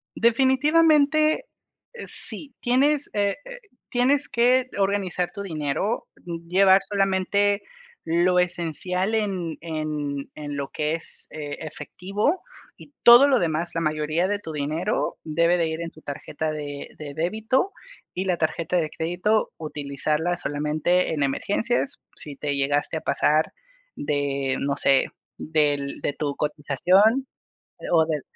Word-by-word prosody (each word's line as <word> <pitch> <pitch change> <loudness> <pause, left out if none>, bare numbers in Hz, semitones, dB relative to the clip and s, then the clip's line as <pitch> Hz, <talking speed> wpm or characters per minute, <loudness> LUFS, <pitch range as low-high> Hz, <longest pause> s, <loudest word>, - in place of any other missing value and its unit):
Definitivamente, 300 - +4 0.5
eh, 475 - -7
sí. 280 -4 -5
Tienes, 280 +4 +2
eh, 200 -1 +1
eh, - - -8 0.3
tienes 270 +4 +2
que 250 +2 +3
organizar 195 -3 0
tu 200 - -7
dinero. 165 +4 -2 0.4
Llevar 190 +1 +5
solamente 200 +1 +1 0.4
lo 175 +2 +2
esencial, 180 +3 -1
en 190 -7 -2
en 150 -3 -4
en 145 -1 -6
lo 140 -1 -3
que 150 0 -1
es, 165 - -4
eh, 145 -2 -6
efectivo. 195 - -2 0.4
Y 290 - -15
todo 240 +4 +9
lo 265 -3 +4
demás, 165 -1 -1
la 165 - 0
mayoría 155 +3 0
de 205 +1 -1
tu 165 - -7
dinero, 155 +7 -2
debe 170 +3 +2
de 165 - +1
ir 160 +1 -4
en 170 - -4
tu 155 - -17
tarjeta 150 +2 -4
de 145 -2 -6
de 145 -2 -7
débito. 220 - 0 0.4
Y 185 +2 -2
la 180 -2 +1
tarjeta 165 +2 -1
de 160 -3 0
crédito, 180 +7 0
utilizarla 150 +3 -2
solamente 155 +4 0
en 145 -3 0
emergencias. 225 - -1 0.2
Si 145 -2 -6
te 145 0 -2
llegaste 145 +3 0
a - - -5
pasar 155 +1 +2 0.4
de, 140 -2 -1
no 140 0 -1
sé, 135 -1 +4 0.3
del 145 -3 0
De 145 - -1
tu 145 -1 -3
cotización, 180 - +2 0.6
o 160 -2 +5
de 155 -3 -2
170 Hz, 135 wpm, -24 LUFS, 150-210 Hz, 0.6 s, todo